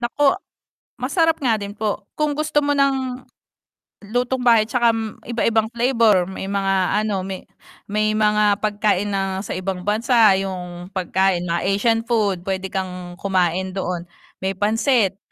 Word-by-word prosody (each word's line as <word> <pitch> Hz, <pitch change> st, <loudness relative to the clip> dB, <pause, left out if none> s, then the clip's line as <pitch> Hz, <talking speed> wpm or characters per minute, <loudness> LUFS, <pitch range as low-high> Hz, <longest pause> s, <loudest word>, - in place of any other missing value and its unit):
Naku! 275 Hz, +4 st, +2 dB, 0.7 s
Masarap 325 Hz, -3 st, +1 dB
nga 240 Hz, -5 st, +2 dB
din 200 Hz, -1 st, -5 dB
po, 210 Hz, -1 st, -3 dB
kung 300 Hz, -1 st, 0 dB
gusto 305 Hz, 0 st, +1 dB
mo 290 Hz, 0 st, 0 dB
ng, 265 Hz, -2 st, 0 dB, 0.8 s
lutong-bahay 245 Hz, +1 st, +2 dB
'tsaka 235 Hz, +1 st, +2 dB, 0.4 s
iba-ibang 225 Hz, -2 st, +1 dB
flavor 230 Hz, -5 st, +3 dB
may 190 Hz, -, -6 dB
mga 195 Hz, 0 st, +1 dB
ano, 205 Hz, -3 st, -1 dB
may, 190 Hz, -1 st, -6 dB, 0.5 s
may 215 Hz, +1 st, +1 dB
mga 210 Hz, -1 st, +3 dB
pagkain, 205 Hz, -1 st, +1 dB
na 195 Hz, -1 st, -1 dB
sa 200 Hz, -, -5 dB
ibang 185 Hz, -1 st, -4 dB
bansa 220 Hz, 0 st, +4 dB
yung 180 Hz, -2 st, -5 dB
pagkain, 190 Hz, 0 st, +1 dB
mga 170 Hz, 0 st, -1 dB
Asian 215 Hz, +4 st, +2 dB
food, 205 Hz, -7 st, 0 dB
puwede 190 Hz, 0 st, -2 dB
kang 180 Hz, -2 st, -5 dB
kumain 185 Hz, -1 st, 0 dB
doon, 180 Hz, -3 st, -3 dB, 0.4 s
may 190 Hz, +1 st, -1 dB
pansit. 210 Hz, 0 st, +1 dB
205 Hz, 135 wpm, -21 LUFS, 190-235 Hz, 0.8 s, bansa